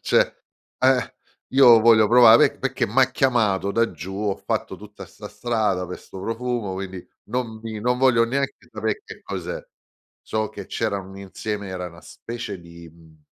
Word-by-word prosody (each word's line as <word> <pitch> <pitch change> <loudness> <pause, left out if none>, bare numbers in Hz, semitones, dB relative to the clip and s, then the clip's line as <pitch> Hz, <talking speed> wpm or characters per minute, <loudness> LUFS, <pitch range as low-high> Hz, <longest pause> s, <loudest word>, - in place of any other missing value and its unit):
Cioè, - - +2 0.5
ehm: 130 -2 +3 0.4
"Io 125 -4 +8
voglio 110 -2 +6
provare 120 0 +6
perché - - -1
m'ha 130 +5 +3
chiamato 110 -7 +1
da 115 -2 +2
giù, 90 +3 -8
ho 100 -1 -1
fatto - - -3
tutta 105 0 -12
'sta 105 0 -11
strada 105 -4 -1
pe' 90 - -6
'sto 95 - -11
profumo, 115 -1 -3
quindi 95 -1 -7 0.2
non 120 -3 -3
mi 110 -2 -6
non 125 +2 +1
voglio 125 -3 +4
neanche 135 +3 -3
sape' 430 - -2
che 450 - -12
cos'è." - - -5 0.6
So 110 -1 -2
che 100 -2 -10
c'erano 100 -4 -3
un 95 - -11
insieme 100 +1 -5
era 90 -1 -5
una 85 -1 -13
specie 115 -5 -7
di 85 0 -13
mhmm, 80 -1 -21
110 Hz, 165 wpm, -23 LUFS, 95-120 Hz, 0.6 s, Io